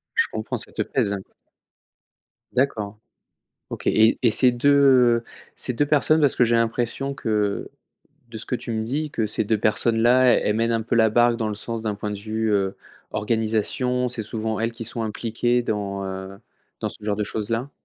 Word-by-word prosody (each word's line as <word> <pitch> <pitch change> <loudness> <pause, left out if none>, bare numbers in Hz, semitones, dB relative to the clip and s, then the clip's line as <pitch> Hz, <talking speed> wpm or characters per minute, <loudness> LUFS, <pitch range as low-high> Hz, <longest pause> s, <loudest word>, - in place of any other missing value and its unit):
Je 460 - +4
comprends, - - -4
ça - - -4
te - - -3
pèse, 120 -7 0
hein? 100 - -3 1.3
D'accord. 110 -6 -1 0.7
OK - - -7
et 110 +1 +4
et 120 - +4
ces 125 +3 +6
2 125 -2 +4 0.3
ces 125 - -2
2 145 +5 +1
personnes, 150 +2 +3
parce 145 -3 +4
que 125 - +4
j'ai 120 0 +2
l'impression 120 +4 -1
que 105 -5 -1 0.6
de 115 -1 -8
ce 110 - -7
que - - -2
tu 120 - -6
me 110 -1 -1
dis 145 +7 -2
que 110 - -1
ces 105 - 0
2 110 +1 +1
personnes-là, 115 +4 +3
elles 105 - 0
mènent 115 +1 +1
un 115 -1 0
peu 115 +2 -2
la 110 -1 +4
barque 120 +1 +3
dans 110 -2 -2
le 105 - -3
sens 115 +2 -5
d'un 110 -2 -2
point 105 +1 -5
de 105 - -5
vue, 110 +1 -2
heu, 95 -1 0 0.3
organisation, 115 +3 0
c'est 120 -2 -3
souvent 110 0 -3
elles 115 +1 -1
qui 115 0 -8
sont 115 +1 -3
impliquées 115 +2 -1
dans, 100 -3 -3
heu, 95 0 -7 0.4
dans - - -1
ce - - -5
genre 105 -1 -1
de 105 - -1
choses-là? 115 +5 -3
115 Hz, 195 wpm, -23 LUFS, 105-120 Hz, 1.3 s, ces